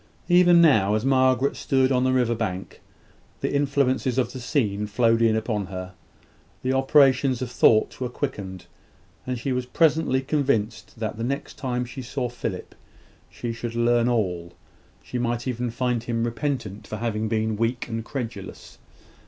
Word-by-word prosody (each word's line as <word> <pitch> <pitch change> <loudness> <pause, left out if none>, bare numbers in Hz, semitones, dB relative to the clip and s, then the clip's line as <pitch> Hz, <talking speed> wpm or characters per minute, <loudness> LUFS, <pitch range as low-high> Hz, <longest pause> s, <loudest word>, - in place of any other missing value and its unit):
Even 175 -1 +6
now, 110 - +4
as 110 +3 -1
Margaret 130 0 +3
stood 130 -1 +1
on 125 -1 +2
the 130 - +2
river 125 -2 +2
bank, 100 -5 -4 0.6
the - - -1
influences 140 -3 +1
of 125 -3 +1
the 130 - -6
scene 105 -6 -1
flowed 115 +2 +2
in 115 -1 +4
upon 110 -3 -2
her. 95 -1 -7 0.7
The 130 +1 +1
operations 135 -1 +4
of 125 - -5
thought 110 0 +3
were 125 - -1
quickened, 100 -9 -5 0.6
and 125 -1 -2
she 130 +3 -3
was 125 -1 -2
presently 155 -3 +2
convinced 130 -6 -1
that 110 -1 -3
the - - -2
next 140 +4 -4
time 125 -2 -2
she 125 +2 -8
saw 125 0 -3
Philip 115 -6 -5 0.6
she 120 -1 -5
should 115 0 -5
learn 120 0 +3
all 90 -7 -1 0.5
she 125 - -4
might 120 +1 -2
even 125 -1 -2
find 125 0 -1
him 115 0 -2
repentant 115 -4 -3
for 110 - -5
having 110 -1 -2
been 110 0 0
weak 115 +3 -1
and 115 -1 -4
credulous. 115 -7 -7
120 Hz, 160 wpm, -24 LUFS, 110-130 Hz, 0.7 s, Even